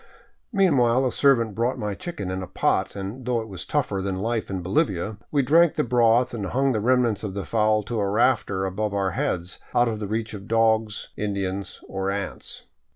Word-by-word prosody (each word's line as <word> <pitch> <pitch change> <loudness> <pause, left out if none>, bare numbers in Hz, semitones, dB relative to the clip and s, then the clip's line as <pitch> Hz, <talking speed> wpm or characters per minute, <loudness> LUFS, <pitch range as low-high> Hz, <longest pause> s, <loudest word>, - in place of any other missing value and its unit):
Meanwhile 135 - +3
a 125 - +1
servant 115 -6 +3
brought 120 +5 0
my 105 -4 -3
chicken 145 - -5
in 95 0 -3
a 95 - -6
pot, 90 - 0
and 100 +6 -6
though 125 -1 0
it 110 - -6
was 95 -3 -8
tougher 125 -10 0
than 95 0 -2
life 110 +4 -2
in 95 -2 -3
Bolivia, 95 +2 0
we 145 -2 +2
drank 165 +4 +4
the - - +1
broth 120 0 +3
and 105 -4 -3
hung 135 +6 +1
the 110 - 0
remnants 120 -2 +2
of 100 -3 -4
the 100 - -3
fowl 110 -1 +2
to 115 +2 -3
a 100 -1 0
rafter 100 -3 +2
above 100 +2 -2
our 95 -1 0
heads, 85 0 -2 0.2
out 120 - +4
of 110 -2 -3
reach 110 +1 -2
of 100 -1 -8
dogs, 110 -1 +1
Indians, 100 -2 -3
or 95 0 -2
ants. 100 0 -5
110 Hz, 200 wpm, -24 LUFS, 100-120 Hz, 0.2 s, drank